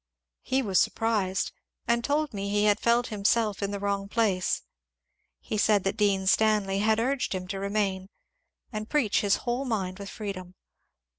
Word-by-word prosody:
He 265 +1 0
was 195 -5 +3
surprised, 210 -5 0 0.4
and 235 +1 +2
told 295 +1 0
me 200 0 -3
he 205 +1 +1
had 210 0 +3
felt 235 +1 +2
himself 210 0 +1
in 200 - -1
the 200 - -3
wrong 200 0 -1
place. 205 -5 +1 0.8
He 215 - -3
said 205 -2 +3
that 195 - -1
Dean 200 -2 +1
Stanley 205 -1 +3
had 220 +1 +2
urged 255 -3 0
him 185 -1 -5
to 195 - -3
remain 195 -1 -1 0.6
and 215 0 -4
preach 270 -9 +2
his 200 -1 +3
whole 245 +2 0
mind 195 -7 -2
with 200 -1 -7
freedom. 185 -4 -6
205 Hz, 165 wpm, -27 LUFS, 195-225 Hz, 0.8 s, was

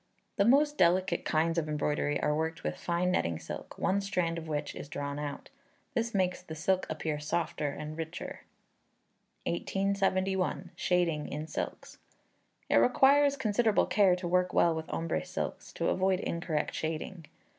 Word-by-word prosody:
The 200 - +4
most 290 +5 +4
delicate 180 0 +3
kinds 165 +2 +2
of 155 -2 -3
embroidery 150 0 0
are 150 - +2
worked 160 +1 -2
with - - -2
fine 175 +1 0
netting 85 - 0
silk, - - -8
one 200 +2 +1
strand 180 -4 -1
of 160 - -9
which 150 -2 -2
is - - -8
drawn 145 0 -4
out. 145 - -6 0.4
This 235 -1 0
makes 185 -1 +1
the 160 -3 -8
silk 185 +4 +1
appear 155 -1 -2
softer 155 0 -1
and 150 +2 -6
richer. 165 +1 -6 1.1
1871. 190 - 0
Shading 170 -4 +1
in 150 +2 -4
Silks. - - -5 0.7
It - - +4
requires 280 +3 +5
considerable 220 -3 +2
care 195 -4 +4
to 180 -1 -4
work 180 +1 +2
well 170 - +5
with 160 0 -5
ombre 165 - -1
silks, - - -5
to - - 0
avoid 185 0 +2
incorrect 170 -4 -2
shading. 160 +2 -4
170 Hz, 155 wpm, -30 LUFS, 155-190 Hz, 1.1 s, requires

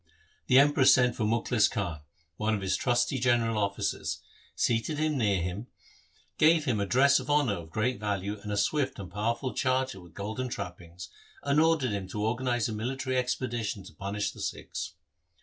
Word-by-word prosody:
The 125 - +5
Emperor 145 0 +5
sent 125 -2 +5
for 110 - -1
Mukhlis 115 0 +2
Khan, 90 -7 -3 0.4
one 110 +1 +1
of 100 - -4
his 95 -1 0
trusty 125 +1 +1
general 120 -2 +2
officers, 100 -1 -2 0.4
seated 120 +6 0
him 155 0 0
near 100 -8 +1
him, 90 +7 -4 0.7
gave 155 0 +5
him 120 -7 +1
a 100 - -1
dress 140 +4 +5
of - - -8
honour 145 -7 +3
of 85 -4 -7
great 110 +6 -1
value 100 0 -2
and 105 - -6
a 105 - -1
swift 135 +5 0
and 95 -4 -8
powerful 115 +6 -2
charger 130 -6 0
with 85 -2 -16
golden 110 +6 -4
trappings, 90 -4 -7 0.3
and 140 +1 +2
ordered 160 -7 +2
him 100 -2 -3
to 105 +3 -3
organize 120 0 0
a 115 - -4
military 130 +4 -2
expedition 120 -5 -2
to 95 - -13
punish 100 +1 -3
the - - -11
Sikhs. - - -5
115 Hz, 180 wpm, -29 LUFS, 100-130 Hz, 0.7 s, The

